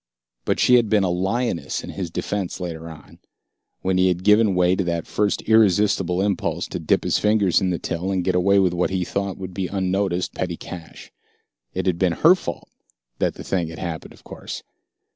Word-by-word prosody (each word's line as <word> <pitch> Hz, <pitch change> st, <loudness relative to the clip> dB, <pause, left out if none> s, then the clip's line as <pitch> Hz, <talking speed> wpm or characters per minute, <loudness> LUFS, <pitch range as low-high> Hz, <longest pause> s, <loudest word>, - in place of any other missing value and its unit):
But -, -, 0 dB
she 125 Hz, -, +6 dB
had 115 Hz, -3 st, +1 dB
been 105 Hz, -2 st, +3 dB
a 90 Hz, -, +1 dB
lioness 95 Hz, +3 st, -1 dB
in -, -, -7 dB
his 95 Hz, -4 st, -4 dB
defense 95 Hz, +2 st, -3 dB
later 85 Hz, -2 st, -5 dB
on, 80 Hz, -2 st, -13 dB, 0.6 s
when 95 Hz, 0 st, +1 dB
he 95 Hz, -, +4 dB
had 90 Hz, 0 st, 0 dB
given 105 Hz, -1 st, +4 dB
way 90 Hz, 0 st, +3 dB
to 95 Hz, -, 0 dB
that 85 Hz, -1 st, -2 dB
first 105 Hz, -1 st, -1 dB
irresistible 100 Hz, -4 st, +3 dB
impulse 100 Hz, -3 st, -1 dB
to -, -, -4 dB
dip -, -, +1 dB
his -, -, +1 dB
fingers 105 Hz, -4 st, +3 dB
in 95 Hz, -, +1 dB
the 90 Hz, -, 0 dB
till 90 Hz, +3 st, -3 dB
and 95 Hz, -2 st, 0 dB
get 95 Hz, -, +1 dB
away 95 Hz, +2 st, +3 dB
with 95 Hz, -3 st, +3 dB
what 90 Hz, 0 st, 0 dB
he 95 Hz, -1 st, -1 dB
thought 100 Hz, +1 st, -3 dB
would 95 Hz, -1 st, -7 dB
be 95 Hz, 0 st, -2 dB
unnoticed 95 Hz, -1 st, -1 dB
petty 90 Hz, -2 st, -3 dB
cash. 85 Hz, -3 st, -10 dB, 0.6 s
It 95 Hz, -, -2 dB
had 90 Hz, -2 st, 0 dB
been 90 Hz, -3 st, +2 dB
her 160 Hz, -, +6 dB
fault 135 Hz, -, -6 dB, 0.5 s
that -, -, 0 dB
the -, -, -8 dB
thing 90 Hz, -4 st, -1 dB
had 80 Hz, -, -8 dB
happened, 85 Hz, -3 st, -6 dB
of -, -, -20 dB
course. -, -, -8 dB
95 Hz, 205 wpm, -22 LUFS, 90-100 Hz, 0.6 s, she